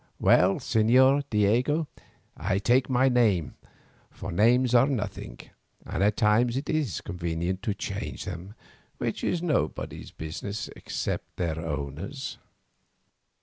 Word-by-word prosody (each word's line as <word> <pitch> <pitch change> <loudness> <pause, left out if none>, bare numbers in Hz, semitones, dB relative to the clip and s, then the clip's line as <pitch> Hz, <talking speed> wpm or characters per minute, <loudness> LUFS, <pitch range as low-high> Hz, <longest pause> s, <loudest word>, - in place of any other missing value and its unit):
Well, 95 +2 +5
Señor 130 +5 +4
Diego, 120 +9 +2 0.5
I 95 - -1
take 120 +7 +2
your 130 +1 +3
name, 110 -9 +2 0.6
for 95 - -7
names 120 +7 +3
are 125 +2 +6
nothing, 105 - -4 0.5
and 95 - -1
at 105 0 +2
times 115 +3 +3
it 140 +1 -4
is 145 - -1
convenient 85 +1 -3
to 105 -1 -2
change - - -5
them, 95 +3 -7 0.4
which - - -3
is 175 -1 0
nobody's 155 -6 -2
business 85 +6 -6
except - - -4
their 80 -3 -1
owners". 80 - -5
105 Hz, 120 wpm, -27 LUFS, 90-130 Hz, 0.6 s, are